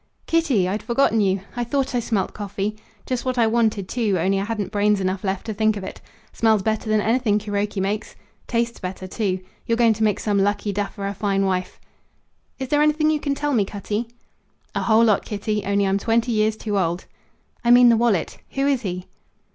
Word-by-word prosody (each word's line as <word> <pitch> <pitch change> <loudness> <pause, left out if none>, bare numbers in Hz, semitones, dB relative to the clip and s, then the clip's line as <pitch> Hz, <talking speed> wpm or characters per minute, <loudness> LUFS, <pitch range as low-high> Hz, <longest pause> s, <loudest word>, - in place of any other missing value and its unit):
"Kitty? 290 - +2
I'd 205 +3 -2
forgotten 235 -3 +2
you! 195 -1 +1
I 245 - -1
thought 265 +2 -1
I 245 - +2
smelt 215 -4 -1
coffee. 205 0 -3 0.3
Just 255 -2 -2
what 255 -1 -2
I 235 - +4
wanted, 220 -4 +1
too, 215 -5 0
only 190 +3 +1
I 195 - -2
hadn't 210 -4 -3
brains 205 0 +2
enough 185 0 -2
left 190 -1 -2
to 220 - -3
think 215 0 +1
of 200 - -6
it. - - -8 0.3
Smells 220 -3 +2
better 220 +1 -1
than 215 -1 +3
anything 225 -1 +2
Kuroki 205 -1 -2
makes.... 205 +3 -2 0.3
Tastes 235 0 -1
better, 185 0 -6
too. 185 -1 -2 0.3
You're 230 - +1
going 230 -2 +5
to 220 +1 -2
make 210 -2 +2
some 205 -2 +1
lucky 205 +1 0
duffer 200 0 -3
a 200 - -2
fine 195 -1 0
wife." 185 -1 -2 0.8
"Is 265 -2 -5
there 295 0 +3
anything 305 +1 +3
you 305 - 0
can 280 -1 -1
tell 290 0 -1
me, 220 -5 +3
Cutty?" 210 +3 -4 0.7
"A - - -1
whole 225 0 +4
lot, 215 -3 +3
Kitty; 210 0 -2
only 200 0 +2
I'm 195 +1 +1
twenty 230 +3 +1
years 215 0 +1
too 205 -3 -1
old." 175 0 -1 0.6
"I 235 - +1
mean 245 0 +8
the 230 - +5
wallet. 225 -6 +1
Who 275 0 0
is 275 -3 +2
he?" 180 -4 -4
215 Hz, 210 wpm, -22 LUFS, 195-235 Hz, 0.8 s, mean